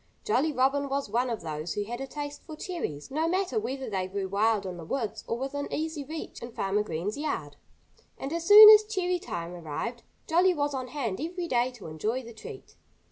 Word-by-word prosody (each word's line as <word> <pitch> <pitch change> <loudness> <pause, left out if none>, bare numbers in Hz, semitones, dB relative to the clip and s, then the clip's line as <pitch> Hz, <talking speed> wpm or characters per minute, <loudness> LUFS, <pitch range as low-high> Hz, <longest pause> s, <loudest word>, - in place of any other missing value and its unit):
Jolly 315 -7 +2
Robin 275 +1 +1
was 275 -5 -2
one 245 +3 +1
of 230 - -3
those 155 0 -4
who 205 - -1
had 240 +4 -6
a 270 - -4
taste 290 0 -6
for 310 - -9
cherries, 305 - -5
no 315 +4 0
matter 375 +4 0
whether 270 -8 -4
they 190 -3 -2
grew 195 0 -3
wild 205 +1 +1
in 180 -2 -5
the 170 - -8
woods 225 +6 -3
or 230 - -1
within 280 +3 -4
easy 315 -1 -3
reach 310 +3 -7
in 235 +1 -7
Farmer 195 +2 0
Green's 205 - -3
yard. 155 - -3 0.6
And 275 +3 -5
as 335 0 -3
soon 420 +1 +12
as 430 0 +8
cherry 370 -4 -1
time 170 - -5
arrived 175 +9 -5 0.2
Jolly 355 +3 +3
was 290 -1 0
on 260 -2 -3
hand 245 -6 -3
every 345 +2 -3
day 245 -3 +2
to 240 -5 -12
enjoy 215 +11 -2
the 235 0 -10
treat. 220 - -11
260 Hz, 210 wpm, -28 LUFS, 205-315 Hz, 0.6 s, soon